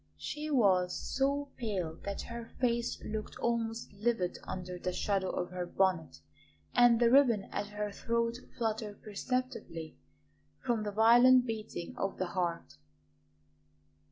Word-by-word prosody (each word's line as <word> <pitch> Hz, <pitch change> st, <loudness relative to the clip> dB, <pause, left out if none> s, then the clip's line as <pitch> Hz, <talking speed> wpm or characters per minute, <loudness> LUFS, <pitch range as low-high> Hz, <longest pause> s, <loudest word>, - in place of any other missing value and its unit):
She 300 Hz, +1 st, -5 dB
was 190 Hz, -10 st, +3 dB
so 280 Hz, +1 st, -1 dB
pale 190 Hz, -9 st, -2 dB
that 200 Hz, 0 st, -3 dB
her 235 Hz, -1 st, -7 dB
face 235 Hz, -1 st, 0 dB
looked 215 Hz, 0 st, -5 dB
almost 230 Hz, -1 st, -2 dB
livid 200 Hz, -3 st, -1 dB
under 180 Hz, -1 st, -5 dB
the 180 Hz, -, -2 dB
shadow 190 Hz, 0 st, 0 dB
of 180 Hz, 0 st, -3 dB
her 180 Hz, -1 st, -3 dB
bonnet, 185 Hz, -3 st, 0 dB, 0.5 s
and 240 Hz, -1 st, +6 dB
the 235 Hz, -1 st, +4 dB
ribbon 245 Hz, -7 st, +5 dB
at 205 Hz, 0 st, -2 dB
her 210 Hz, 0 st, -4 dB
throat 235 Hz, +3 st, -1 dB, 0.2 s
fluttered 220 Hz, -3 st, -3 dB
perceptibly 215 Hz, -7 st, -4 dB, 0.6 s
from 240 Hz, -4 st, 0 dB
the 210 Hz, -1 st, -3 dB
violent 245 Hz, +4 st, +6 dB
beating 215 Hz, -6 st, -5 dB
of 195 Hz, -, -2 dB
the 185 Hz, -1 st, -2 dB
heart. 170 Hz, -, -2 dB
220 Hz, 130 wpm, -32 LUFS, 185-235 Hz, 0.6 s, and